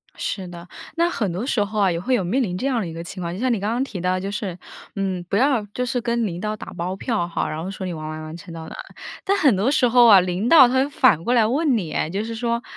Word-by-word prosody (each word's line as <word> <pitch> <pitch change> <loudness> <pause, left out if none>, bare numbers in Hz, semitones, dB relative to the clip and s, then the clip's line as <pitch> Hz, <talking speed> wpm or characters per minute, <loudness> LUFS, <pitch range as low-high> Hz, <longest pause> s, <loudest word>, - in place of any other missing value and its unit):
是 190 -3 -4
的。 175 0 -10 0.3
那 340 +1 +3
很 210 - -2
多 190 +8 -3
时 230 -6 +1
候 210 +1 -4
啊， 195 -3 +3
也 170 - -2
会 255 +9 -1
有 225 -7 +2
面 245 +9 +1
临 180 -4 -3
这 265 - -2
样 250 -4 +1
的 180 - -3
一 165 - -7
个 165 - -6
情 180 +2 -8
况， 170 -1 -3
就 185 - -6
像 255 +1 +1
你 230 - 0
刚 205 +3 -1
刚 245 +3 0
提 205 -9 -6
到 185 +1 0
就 195 +2 -4
是， 200 -4 -4 0.4
嗯， 190 -3 -2
不 - - -1
要 260 -3 +2
就 250 - -1
是 245 0 -1
跟 235 -1 0
领 175 -2 -5
导 215 +3 -2
打 - - -9
包 180 +2 -3
票 210 -4 -2
哈， 170 - -2
然 155 +1 -4
后 190 - -4
说 190 -1 -6
你 180 - -3
完 155 -1 -6
完 155 0 -6
完 155 +1 -8
成 170 0 -11
到 165 -1 -8
哪 - - -9
儿。 - - -11 0.3
但 395 +1 +1
很 270 - +4
多 210 +8 +1
时 255 -4 +3
候 240 0 +6
啊 205 -4 +9
领 180 +5 -1
导 280 -7 +9
他 250 - -2
会 265 +2 +2
反 210 - +3
过 245 - +1
来 230 -3 +4
问 275 0 +2
你 170 -7 -4
哎， - - -1
就 195 +5 -2
是 230 - -5
说： 235 +1 -1
205 Hz, 335 characters per minute, -22 LUFS, 180-245 Hz, 0.4 s, 啊